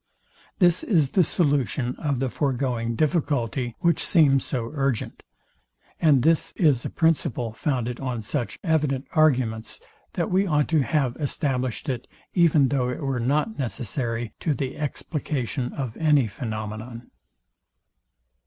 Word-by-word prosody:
This 175 -3 +4
is 155 - +2
the 185 - +4
solution 140 -6 0
of 140 -4 -1
the 135 - 0
foregoing 125 -4 -1
difficulty, 135 -5 0
which 170 -2 +3
seems 140 -6 +4
so 120 -4 -3
urgent; 135 -6 -2 0.8
and 145 -6 +4
this 165 +1 +2
is 145 -8 +2
a - - -3
principle 150 -8 0
founded 125 -2 -2
on 125 -4 -3
such 120 +2 -2
evident 150 -6 +1
arguments, 130 -9 +1 0.3
that - - -2
we 195 +2 +2
ought 150 -3 +2
to 160 -3 +3
have 135 -4 0
established 130 -3 -2
it, 125 -3 -3 0.3
even 160 -6 +4
though 130 -3 0
it 125 +5 -4
were 135 -2 -1
not 150 - 0
necessary 120 -2 -3
to 155 -4 0
the 130 -1 -3
explication 145 -4 -3
of 130 -5 -5
any 150 -5 +4
phænomenon. 110 +1 -6
135 Hz, 135 wpm, -25 LUFS, 120-155 Hz, 0.8 s, This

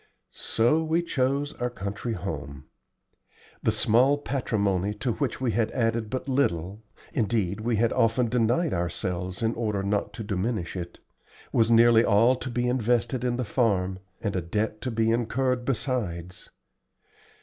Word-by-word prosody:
So 120 +8 +1
we 160 +2 +1
chose 140 -1 0
our 125 - +1
country 110 +1 -4
home. 75 -7 -6 1.0
The - - +2
small 130 +6 +3
patrimony 105 -8 -1
to 105 +4 -1
which 135 0 -2
we 130 -3 0
had 110 0 +1
added 115 -3 0
but 130 +3 -4
little 100 - 0 0.3
(indeed 110 - 0
we 115 +1 0
had 115 +2 +2
often 115 +2 +2
denied 125 +7 +1
ourselves 90 +3 -3
in 115 +1 +1
order 105 -4 -2
not 100 +1 -1
to 110 - -6
diminish 100 -2 -2
it) 85 -1 -6 0.6
was 115 -1 +3
nearly 115 0 +6
all 115 +4 +4
to 130 - -5
be 120 0 -1
invested 125 0 +1
in 125 -1 0
the 125 - -2
farm, 95 -5 0 0.2
and 105 -3 -2
a 95 - 0
debt 105 +5 -2
to 130 - -2
be 115 -1 +1
incurred, 125 +2 0
besides. 95 -10 -3
115 Hz, 150 wpm, -26 LUFS, 100-125 Hz, 1.0 s, nearly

